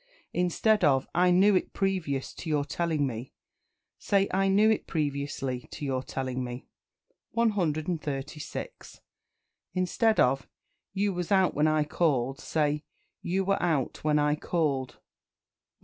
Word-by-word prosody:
Instead 180 +5 +2
of 135 -2 +3
"I 180 +1 +4
knew 190 +3 +5
it 185 - 0
previous 180 -9 -1
to 165 - -7
your 145 -2 +1
telling 160 -2 0
me," 120 0 -5 0.7
say 200 -1 +2
"I 195 +1 +2
knew 200 +3 +4
it 220 - -1
previously 140 -4 -2
to 145 - -6
your 130 -2 -1
telling 130 -1 -3
me." 125 +1 -6 0.7
136. 160 - -2 0.7
Instead 215 +5 +2
of 135 +2 +3 0.4
"You 200 0 0
was 175 0 -4
out 190 -2 +4
when 150 +1 +2
I 155 -1 +3
called," 140 -4 0
say 150 -1 0 0.4
"You 190 +2 -1
were 195 +1 +1
out 155 -7 -1
when 150 0 +3
I 150 0 +3
called." 150 -5 -1
137. - - -33
155 Hz, 135 wpm, -28 LUFS, 140-185 Hz, 0.7 s, knew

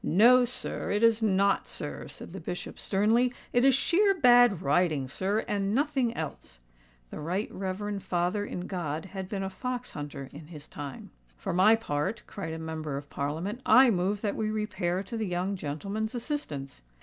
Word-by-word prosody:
"No, 245 +8 +6
sir—it 230 -3 -2
is 230 0 +5
not, 200 -2 +2
sir," - - -5
said - - -10
the - - -6
Bishop - - -6
sternly: 225 +5 +2 0.2
"it 245 - +4
is 270 -1 +6
sheer 390 +8 +3
bad 245 - +6
riding, 150 -2 +2
sir—and 200 - -1
nothing 275 -4 +1
else." 145 - -6 0.5
The - - -6
Right 180 +8 -2
Reverend 195 +2 -3
Father 180 +4 0
in 180 - -5
God 165 -4 -3
had 190 -1 -6
been 195 -2 -3
a 190 - -2
fox 250 +3 -4
hunter 145 -2 -6
in 150 +1 -10
his 155 -3 -10
time. 140 -3 -8 0.3
"For - - -3
my 190 +5 +6
part," 150 -2 -2
cried 165 -6 -6
a - - -4
Member 160 -3 -4
of 145 0 -9
Parliament, 165 - -3
"I 250 +2 +7
move 195 +2 0
that 205 -2 -1
we 215 -1 -1
repair 195 -4 -1
to 215 +4 -7
the 220 -2 -2
young 180 +2 -1
gentleman's 195 - -4
assistance." 225 - -4
195 Hz, 175 wpm, -29 LUFS, 160-225 Hz, 0.5 s, I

